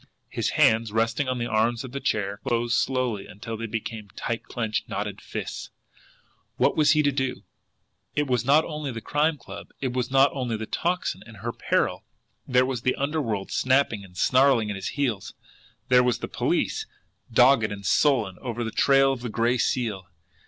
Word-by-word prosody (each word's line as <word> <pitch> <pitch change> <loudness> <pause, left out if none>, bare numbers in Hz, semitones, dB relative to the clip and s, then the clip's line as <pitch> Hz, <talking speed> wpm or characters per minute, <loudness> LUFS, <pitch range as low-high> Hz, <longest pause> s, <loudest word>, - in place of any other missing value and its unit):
His - - -1
hands, 110 -1 +4
resting 115 +5 0
on 130 0 -1
the 120 - -2
arms 115 +2 +1
of 130 - -8
the 140 - -4
chair, 100 -5 -1
closed 120 0 0
slowly 125 -6 0
until 110 +3 -7
they 115 +1 -4
became 110 -1 -5
tight 115 -1 -3
clenched, 110 -3 -3
knotted - - -4
fists. - - -6 0.9
What - - +3
was 155 -1 +5
he 155 -1 +3
to 145 - +3
do? 130 -2 -2 0.7
It 150 - +1
was 125 -4 0
not 145 +5 +4
only 150 -3 -4
the 115 - -5
Crime 150 +7 +1
Club, - - -10
it 130 -2 -2
was 125 0 -1
not 135 +1 +5
only 125 -5 -2
the 110 - -5
Tocsin 175 +9 -2
and 115 -1 -12
her 115 +4 -4
peril - - 0 0.4
there 125 0 +4
was 130 -3 -3
the 130 - +1
underworld 135 -9 -2
snapping 130 -5 +2
and 90 -2 -15
snarling 130 -2 +3
at - - -4
his 95 -1 -5
heels, 125 -8 -2 0.5
there 125 0 +6
was 125 -1 +1
the - - -5
police, - - -1 0.4
dogged 115 -6 +5
and 100 -1 -7
sullen, 115 -11 +2
ever 120 -2 -3
on - - -1
the 110 - -3
trail 135 +4 +4
of 125 - -7
the 120 - -4
Gray 120 +3 +1
Seal! 110 -8 -1
120 Hz, 190 wpm, -25 LUFS, 110-135 Hz, 0.9 s, there